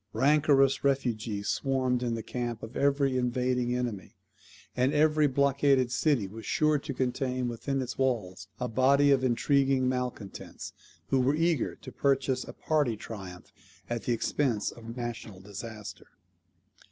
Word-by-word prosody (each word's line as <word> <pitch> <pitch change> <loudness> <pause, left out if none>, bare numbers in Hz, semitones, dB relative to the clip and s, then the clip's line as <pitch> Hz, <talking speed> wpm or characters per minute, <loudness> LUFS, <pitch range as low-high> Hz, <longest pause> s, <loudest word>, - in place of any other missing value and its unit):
Rancorous 140 -1 +3
refugees 115 -7 -1
swarmed 130 -2 0
in 120 -2 -1
the 115 - -5
camp 120 -2 -4
of 115 +3 -8
every 140 -2 +2
invading 125 0 0
enemy; 120 -6 -4 0.6
and 130 +3 +2
every 150 0 +4
blockaded 140 -2 +2
city 130 -4 +2
was 110 +3 -10
sure 155 -1 +2
to 140 - -6
contain 130 0 -1
within 135 +4 -2
its 125 +1 -7
walls 100 -8 -1
a 125 - -1
body 140 +4 +4
of 135 -2 +3
intriguing 135 +1 +2
malcontents, 125 -5 -4 0.4
who 135 - +3
were 130 +3 +2
eager 165 0 +1
to - - -11
purchase 135 -2 +1
a - - -9
party 145 -8 0
triumph 95 -5 -9 0.4
at 120 -1 -3
the - - 0
expense 120 -1 0
of 115 - -13
a 115 +2 -7
national 115 -4 -6
disaster. 105 +2 -9
125 Hz, 145 wpm, -29 LUFS, 115-140 Hz, 0.6 s, every